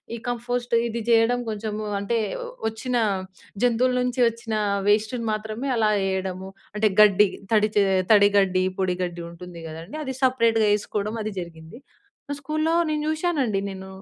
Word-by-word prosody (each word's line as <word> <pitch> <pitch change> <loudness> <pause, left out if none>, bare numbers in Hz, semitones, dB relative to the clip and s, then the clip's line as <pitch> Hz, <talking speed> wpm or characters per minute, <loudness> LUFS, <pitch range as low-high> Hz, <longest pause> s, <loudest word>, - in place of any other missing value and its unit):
ఈ - - -5
కంపోస్ట్ 240 0 -3
ఇది 230 0 -4
చేయడం, 230 +2 +4
కొంచెం 210 0 -4 0.3
అంటే 230 +3 0 0.5
వచ్చిన, 245 +3 -3 0.7
జంతువుల 245 +1 +3
నుంచి 250 +1 -2
వచ్చిన 230 -1 -7 0.4
వేస్ట్‌ని 220 +3 +1
మాత్రమే 220 +5 -4
అలా 215 -1 +3 0.2
ఎయడము. 190 0 -3 0.3
అంటే, 210 0 +3
గడ్డి, 205 -1 +6 0.2
తడిచే 210 -1 +3 0.3
తడిగడ్డి, 200 -2 +4
పొడగడ్డి 180 -2 -2
ఉంటుంది 175 0 -10
కదండీ! 165 - -8
అది 265 -1 -4
సెపరేట్‌గా 230 -4 +3
వేసుకోవడం, 210 +1 -2
అది 215 -1 -4
జరిగింది. 165 +6 -11 0.6
స్కూల్‌లో 310 +3 -1
నేను 300 -1 -1
చూశానండి, 310 - 0
నేను. 190 0 -8
215 Hz, 130 wpm, -24 LUFS, 195-245 Hz, 0.7 s, గడ్డి